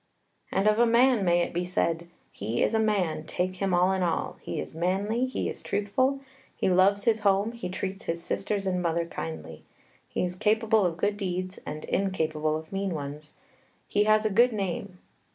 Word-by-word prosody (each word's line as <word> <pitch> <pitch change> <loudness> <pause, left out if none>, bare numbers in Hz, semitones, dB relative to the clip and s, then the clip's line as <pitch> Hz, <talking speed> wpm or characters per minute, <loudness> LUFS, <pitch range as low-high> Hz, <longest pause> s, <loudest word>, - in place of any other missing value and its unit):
And 195 +2 +1
of 215 +1 +4
a 240 - +5
man 235 -1 +4
may 175 -1 +3
it - - -2
be 175 +1 0
said, 170 -1 -1 0.2
"He 110 +4 -1
is - - +1
a 220 - +3
man, 195 -8 +1
take 185 +1 -2
him 195 0 0
all 180 +1 +4
in 190 -1 0
all; 170 -2 -1
he - - -4
is - - -6
manly, 200 +9 0
he 260 - -2
is - - -4
truthful; 260 +7 0 0.3
he - - +1
loves 195 +2 +4
his 225 -2 +3
home; 200 +1 +2
he 235 -6 -6
treats 190 +1 -4
his 165 0 -2
sisters 200 +1 -1
and 180 -1 0
mother 170 -1 0
kindly. 80 - -7 0.5
He - - -1
is 180 0 -4
capable 215 0 +3
of 165 -1 -4
good 205 +3 0
deeds, 185 -1 -3
and 150 +1 -5
incapable 155 -5 0
of 160 0 -10
mean 195 -2 -1
ones. 150 +1 -7 0.5
He 205 +1 +2
has 215 0 +4
a 215 - +2
good 240 +4 +4
name." 195 -2 -3
190 Hz, 195 wpm, -27 LUFS, 170-210 Hz, 0.5 s, a